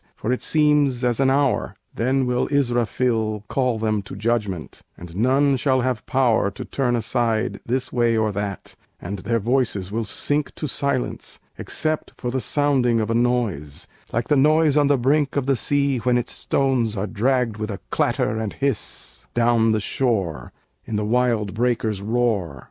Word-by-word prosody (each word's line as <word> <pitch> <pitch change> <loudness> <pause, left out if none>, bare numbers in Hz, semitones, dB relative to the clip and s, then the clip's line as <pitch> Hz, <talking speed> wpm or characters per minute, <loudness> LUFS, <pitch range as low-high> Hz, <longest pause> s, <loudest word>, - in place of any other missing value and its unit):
For 110 - -3
it 125 - -1
seems 150 -5 +2
as 120 0 +1
an 135 -1 +4
hour!" 135 0 +1 0.2
Then 130 +3 +1
will 125 0 0
Israfil 120 -5 0
call 125 -4 0
them 110 -1 0
to 95 - -9
judgment: 105 -5 -2 0.2
And 85 -1 -10
none 135 +5 +3
shall 130 0 +2
have 125 -3 -2
power 125 -7 +2
To 100 - -8
turn 125 -3 0
aside, 115 -1 0
this 130 +2 -2
way 120 -2 +2
or 110 -1 +1
that; 100 -1 -5 0.2
And 100 +3 -5
their 115 +4 0
voices 115 -4 0
will 115 +1 -2
sink 145 +7 -1
To - - -4
silence, 140 -2 -2 0.2
except 155 0 -3
for 125 - -3
the 130 0 -1
sounding 130 -2 +2
Of 110 +1 -1
a - - +2
noise, 115 - -1 0.3
like 120 +1 -1
the 150 - +3
noise 155 +1 +4
on 145 -1 +4
the 145 -1 +3
brink 140 +3 +1
Of 140 -3 0
the 135 0 +2
sea 140 +1 +1
when 125 +1 +2
its 120 - -2
stones 125 -6 0
Are 95 - -1
dragged 115 +1 0
with 110 0 -4
a 100 - -5
clatter 110 +1 0
and 110 -2 -3
hiss 115 - -3
Down 115 -1 +3
the 110 - +2
shore, 105 - -1 0.3
in 110 - -5
the 105 0 0
wild 115 -3 +1
breakers' 110 -3 0
roar! 105 - 0
120 Hz, 175 wpm, -22 LUFS, 110-135 Hz, 0.3 s, an